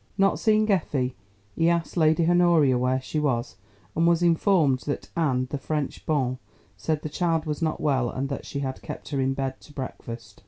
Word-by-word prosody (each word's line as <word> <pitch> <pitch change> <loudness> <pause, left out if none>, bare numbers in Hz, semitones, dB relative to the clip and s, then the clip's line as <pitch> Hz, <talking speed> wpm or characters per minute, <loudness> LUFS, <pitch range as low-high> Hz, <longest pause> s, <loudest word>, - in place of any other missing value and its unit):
Not 195 0 +3
seeing 215 -1 +3
Effie, 140 -9 0 0.4
he 165 - +3
asked 170 -2 0
Lady 160 0 +3
Honoria 170 -6 +4
where 125 +1 +1
she 140 +4 -3
was, 130 -5 -1 0.4
and 165 +1 +3
was 170 0 +3
informed 165 -5 +3
that 145 - -4
Anne, 135 -7 +1
the 145 - -2
French 150 -1 -3
bonne, 130 -5 0 0.4
said 150 +10 -2
the - - -2
child 165 +1 0
was 150 -1 -3
not 160 -1 0
well 130 -5 +1
and 135 +3 -3
that 140 -1 -4
she 140 - -4
had 130 -1 -4
kept - - -8
her 140 -3 -1
in 135 0 0
bed 135 -1 -3
to - - -15
breakfast. 115 -5 -7
150 Hz, 195 wpm, -26 LUFS, 130-165 Hz, 0.4 s, Honoria